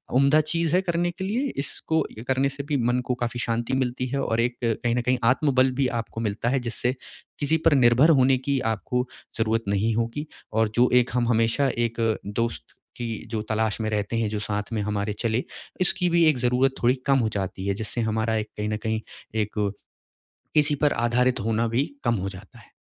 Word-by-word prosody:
उम्दा 140 Hz, +4 st, +5 dB
चीज़ 165 Hz, +1 st, 0 dB
है 185 Hz, -, +4 dB
करने 175 Hz, -1 st, 0 dB
के 190 Hz, +2 st, -7 dB
लिए। 245 Hz, +7 st, -1 dB
इसको 160 Hz, +3 st, -1 dB, 0.3 s
करने 135 Hz, +1 st, +2 dB
से 140 Hz, +1 st, -6 dB
भी 145 Hz, -, +2 dB
मन 125 Hz, -, +1 dB
को 125 Hz, -, 0 dB
काफ़ी 120 Hz, +1 st, -2 dB
शांति 115 Hz, +2 st, -1 dB
मिलती 130 Hz, -1 st, -1 dB
है 140 Hz, +2 st, -1 dB
और 115 Hz, -, 0 dB
एक 120 Hz, 0 st, -1 dB
कहीं 115 Hz, +1 st, 0 dB
न 125 Hz, -, +1 dB
कहीं 125 Hz, +1 st, +1 dB
आत्मबल 130 Hz, -2 st, +3 dB
भी 130 Hz, -, +3 dB
आपको 115 Hz, 0 st, -7 dB
मिलता 110 Hz, +2 st, -1 dB
है, 135 Hz, -, +1 dB
जिससे 120 Hz, +1 st, -2 dB, 0.5 s
किसी 150 Hz, +2 st, +2 dB
पर 165 Hz, -, +6 dB
निर्भर 125 Hz, +3 st, +5 dB
होने 135 Hz, -3 st, +5 dB
की 135 Hz, +1 st, -1 dB
आपको 125 Hz, +4 st, -2 dB, 0.3 s
ज़रूरत 110 Hz, 0 st, +1 dB
नहीं 100 Hz, +3 st, +1 dB
होगी 115 Hz, +7 st, -2 dB, 0.3 s
और 110 Hz, 0 st, +2 dB
जो 125 Hz, +1 st, +4 dB
एक 125 Hz, -1 st, +4 dB
हम 120 Hz, -1 st, +1 dB
हमेशा 115 Hz, +4 st, +2 dB
एक 120 Hz, 0 st, -1 dB, 0.3 s
दोस्त 115 Hz, +3 st, -2 dB, 0.3 s
की 120 Hz, -2 st, -3 dB, 0.2 s
जो 110 Hz, -2 st, -1 dB
तलाश 110 Hz, 0 st, 0 dB
में 110 Hz, -, -1 dB
रहते 105 Hz, +1 st, -1 dB
हैं, 115 Hz, -1 st, +1 dB
जो 105 Hz, 0 st, -2 dB
साथ 105 Hz, +1 st, -3 dB
में 110 Hz, -, 0 dB
हमारे 105 Hz, 0 st, -1 dB
चले, 115 Hz, +1 st, 0 dB, 0.4 s
इसकी 185 Hz, 0 st, +2 dB
भी 170 Hz, -1 st, +4 dB
एक 150 Hz, -, +1 dB
ज़रूरत 125 Hz, +2 st, +2 dB
थोड़ी 125 Hz, +2 st, +4 dB
कम 135 Hz, -1 st, +4 dB
हो 115 Hz, -3 st, +1 dB
जाती 95 Hz, 0 st, -3 dB
है, 100 Hz, -, +2 dB
जिससे 110 Hz, +3 st, -3 dB
हमारा 110 Hz, 0 st, 0 dB
एक 105 Hz, 0 st, -3 dB
कहीं 105 Hz, 0 st, -2 dB
न 105 Hz, -, -1 dB
कहीं, 110 Hz, 0 st, -1 dB, 0.3 s
एक, 105 Hz, -1 st, 0 dB, 1.0 s
किसी 150 Hz, -1 st, +4 dB
पर 145 Hz, -, +4 dB
आधारित 120 Hz, +2 st, +1 dB
होना 115 Hz, +2 st, 0 dB
भी 120 Hz, +5 st, +1 dB, 0.2 s
कम 120 Hz, -1 st, +2 dB
हो 100 Hz, -, -2 dB
जाता 100 Hz, +5 st, -11 dB
है। 105 Hz, -, -19 dB
120 Hz, 205 wpm, -25 LUFS, 110-135 Hz, 1.0 s, पर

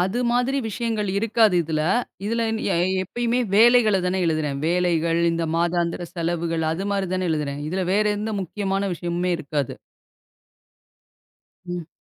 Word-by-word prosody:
அது 190 Hz, +6 st, 0 dB
மாதிரி 250 Hz, +3 st, +1 dB
விஷயங்கள் 220 Hz, -1 st, -2 dB
இருக்காது 220 Hz, -1 st, +3 dB
இதுல. 155 Hz, -1 st, -2 dB, 0.5 s
இதுல 230 Hz, +2 st, 0 dB, 0.3 s
எ -, -, +1 dB, 0.3 s
எப்பயுமே 240 Hz, +5 st, -1 dB, 0.2 s
வேலைகளத் 220 Hz, -4 st, +5 dB
தான் 185 Hz, +1 st, 0 dB
எழுதுறேன். 155 Hz, -4 st, 0 dB
வேலைகள். 170 Hz, -1 st, +1 dB
இந்த 165 Hz, 0 st, -1 dB
மாதாந்திர 170 Hz, 0 st, 0 dB
செலவுகள் 165 Hz, -1 st, -1 dB
அது 190 Hz, +5 st, -3 dB
மாரி 195 Hz, -2 st, -1 dB
தான 185 Hz, 0 st, -1 dB
எழுதுறேன். 145 Hz, -2 st, -2 dB
இதுல 185 Hz, +3 st, -1 dB
வேற 210 Hz, +2 st, +3 dB
எந்த 215 Hz, +1 st, -3 dB
முக்கியமான 195 Hz, +1 st, -2 dB
விஷயமுமே 175 Hz, +1 st, -2 dB
இருக்காது. 145 Hz, -3 st, -3 dB, 1.9 s
ம். 175 Hz, -2 st, -5 dB
180 Hz, 130 wpm, -23 LUFS, 165-210 Hz, 1.9 s, வேலைகளத்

